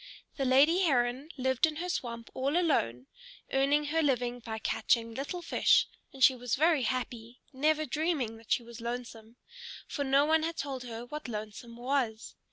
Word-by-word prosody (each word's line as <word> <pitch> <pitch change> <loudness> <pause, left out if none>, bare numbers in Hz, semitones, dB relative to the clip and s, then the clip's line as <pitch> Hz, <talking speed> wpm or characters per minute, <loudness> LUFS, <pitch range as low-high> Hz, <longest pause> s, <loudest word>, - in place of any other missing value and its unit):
The 275 - -1
lady 280 +7 +5
Heron 260 -3 +1
lived 260 +3 +2
in 310 - -5
her 345 +4 -4
swamp 235 -9 -4
all 275 +5 0
alone, 130 - +1 0.5
earning 280 +2 +3
her 325 - +3
living 245 -4 0
by 225 -2 -6
catching 230 +1 0
little 285 +8 -5
fish; - - +4 0.3
and 265 -1 -3
she 260 - +8
was 245 -1 -2
very 315 0 +3
happy, 245 -1 -3
never 305 +3 +1
dreaming 295 -6 -1
that 225 -1 -16
she 240 - +2
was 235 0 -11
lonesome, 235 -1 -6 0.5
for 285 - -3
no 275 +1 +4
one 320 +1 +3
had 330 +1 -3
told 265 -3 -4
her 235 0 -6
what 300 +3 -7
lonesome 220 +1 -7
was. 240 -3 -1
260 Hz, 175 wpm, -30 LUFS, 235-300 Hz, 0.5 s, she